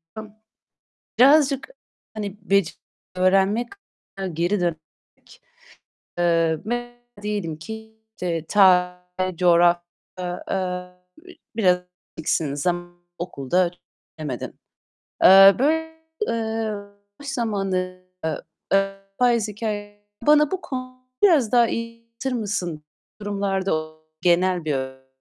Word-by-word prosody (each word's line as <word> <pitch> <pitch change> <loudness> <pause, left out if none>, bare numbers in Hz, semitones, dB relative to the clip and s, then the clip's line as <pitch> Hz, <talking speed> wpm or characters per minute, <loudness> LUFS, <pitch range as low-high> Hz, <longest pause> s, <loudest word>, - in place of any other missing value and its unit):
a 220 - -5 1.0
birazcık 275 - +5 0.4
hani 205 -2 -5
bec 200 -3 +2 0.4
öğrenmek 195 +5 +3 0.7
geri 175 +5 0
dön, 175 -2 +1 1.4
eee, 165 -2 +2
m 240 +1 -4 0.2
diyelim 205 -7 -3
ki 220 +5 -9 0.5
ta 180 -3 +5 0.4
coğrafy 175 0 +5 0.4
eee, 180 0 -3 1.2
biraz 180 -5 +4 0.4
bil 155 -2 0
zam 175 +3 -2 0.2
okulda 175 +1 0 0.5
bilemedin. 140 -6 -5 0.6
Eee, 195 +1 +9
böy 295 +5 +4 0.5
eee, 225 -1 -1 0.5
boş 285 - -10
zamanı, 195 -7 -2 0.2
eee, 160 -2 -1 0.4
e 195 0 +2 0.3
biraz 235 -3 +3
hikâye 205 -1 -5 0.2
bana 300 0 +5
bu 380 - -2
konu 255 -3 -7 0.2
biraz 310 - +5
daha 240 -2 +5
iy 230 0 -4
anlatır 230 +3 -6
mısın? 175 -7 -3 0.4
Durumlarda 195 -6 -1 0.3
genel 180 -1 +3
böy 130 -2 -3
195 Hz, 95 wpm, -23 LUFS, 175-230 Hz, 1.4 s, Eee